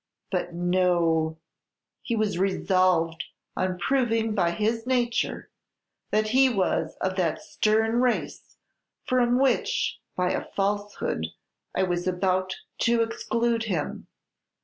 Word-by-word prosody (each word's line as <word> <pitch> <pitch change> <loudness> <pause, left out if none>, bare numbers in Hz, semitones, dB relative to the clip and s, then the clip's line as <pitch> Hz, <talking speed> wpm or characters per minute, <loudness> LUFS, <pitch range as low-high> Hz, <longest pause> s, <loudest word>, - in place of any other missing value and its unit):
But 180 -2 -1
no! 170 -2 +1 0.6
He 235 - -2
was 210 -5 0
resolved 185 -4 +2 0.3
on 185 -1 -1
proving 225 +1 +1
by 175 -4 +2
his 225 +6 -1
nature 245 -2 0 0.6
that 215 0 +1
he 260 +3 +5
was 195 -6 0
of 185 0 -1
that 175 -4 0
stern 220 +2 +1
race 250 -1 -1 0.5
from 245 -1 +2
which, 275 - +1 0.2
by 180 0 +1
a - - -1
falsehood, 205 - -1 0.5
I - - +2
was 175 -1 -1
about 185 +1 0 0.2
to 235 0 +3
exclude 230 0 -1
him. 175 -9 -3
200 Hz, 115 wpm, -26 LUFS, 180-230 Hz, 0.6 s, he